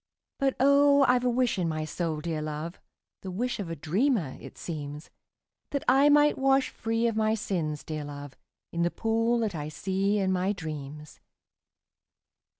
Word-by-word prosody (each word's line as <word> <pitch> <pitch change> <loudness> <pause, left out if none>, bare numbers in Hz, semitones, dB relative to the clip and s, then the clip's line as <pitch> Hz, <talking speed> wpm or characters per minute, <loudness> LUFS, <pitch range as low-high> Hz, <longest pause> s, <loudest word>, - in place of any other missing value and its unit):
But, 270 -1 +1
oh, 280 +1 +5
I 250 0 +4
've 250 - -5
a - - +3
wish 245 -4 +1
in 170 -2 0
my 155 -1 -2
soul, 155 -1 -3
dear 160 -1 -3
love, 155 +3 -5 0.4
(The 190 - -6
wish 235 +7 -2
of 190 -5 -4
a 165 - -3
dreamer, 180 - 0
it - - -11
seems,) 150 -2 -6 0.6
That 280 - -2
I 275 +3 +6
might 295 0 +4
wash 270 0 +3
free 225 +1 -1
of 230 -2 +1
my 220 0 +2
sins, 160 -8 -3
dear 155 -1 -4
love, 145 -2 -8 0.4
In 170 - -2
the 170 - +3
pool 225 +4 +1
that 215 -4 -1
I 150 -2 -4
see 195 +5 0
in 190 -2 +1
my 185 +2 +1
dreams. 150 -4 -7
190 Hz, 175 wpm, -28 LUFS, 155-245 Hz, 0.6 s, I